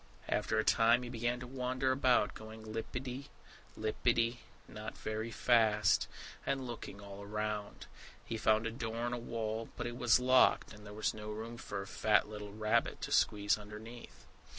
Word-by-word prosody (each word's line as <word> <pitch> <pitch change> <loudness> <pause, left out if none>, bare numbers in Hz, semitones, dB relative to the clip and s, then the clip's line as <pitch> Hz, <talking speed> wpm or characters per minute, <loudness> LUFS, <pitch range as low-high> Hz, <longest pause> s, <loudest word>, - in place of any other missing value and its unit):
After - - 0
a - - +3
time 115 +2 +4
he 120 - -6
began 120 0 -1
to - - -5
wander 130 +1 -1
about, 130 -5 +3
going 110 0 -10
lippity 125 +5 -5 0.5
lippity 115 +2 +1 0.3
not 105 0 -7
very 110 +1 -3
fast, 110 -3 +3 0.4
and 135 -1 -1
looking 115 -4 -7
all 100 0 -9
around. 105 0 -3 0.4
He 115 - -3
found 110 0 +3
a 115 - -1
door 115 0 -3
in 120 - -1
a 120 - -2
wall; 115 -1 -3
but 120 - -3
it 120 0 -4
was 120 0 +5
locked, 130 -2 +4
and 105 0 -12
there 105 - -8
was 110 - 0
no 105 0 -7
room 110 +2 -5
for 100 -4 -5
a - - -10
fat 105 +2 +2
little 105 -1 -7
rabbit 110 +1 +1
to - - -4
squeeze 105 0 +3
underneath. 110 +3 -10
115 Hz, 175 wpm, -34 LUFS, 105-120 Hz, 0.5 s, was